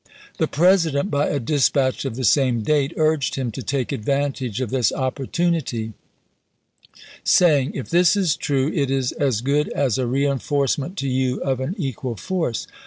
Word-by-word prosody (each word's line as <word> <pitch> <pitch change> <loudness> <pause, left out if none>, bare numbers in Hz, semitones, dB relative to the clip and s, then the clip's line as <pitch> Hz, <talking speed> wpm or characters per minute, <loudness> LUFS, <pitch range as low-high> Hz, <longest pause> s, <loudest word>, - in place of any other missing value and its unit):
The - - +2
President, 165 -1 +2
™<i - - -9
by 145 0 +1
a 145 - -1
dispatch 135 0 +1
of 130 -4 -3
the 130 - -4
same 125 -1 +2
date, 145 +2 +1
urged 155 -2 +1
him 130 -3 -2
to 130 - -6
take 130 +2 -2
advantage 135 -1 -2
of 130 -5 -3
this 130 -4 +2
opportunity, 130 -3 -2 1.3
saying: 150 -7 +3
If 135 - -6
this 175 +2 +4
is 185 -7 +1
true, 140 +1 0
it 140 -4 0
is 135 -2 0
as 130 -7 0
good 145 +4 +1
as 135 -3 0
a 125 - 0
reenforcement 140 +5 -1
to 140 - -2
you 130 -1 0
of 130 -2 -1
an 130 +8 -3
equal 130 - -4
force. 165 - -2
135 Hz, 170 wpm, -22 LUFS, 130-150 Hz, 1.3 s, this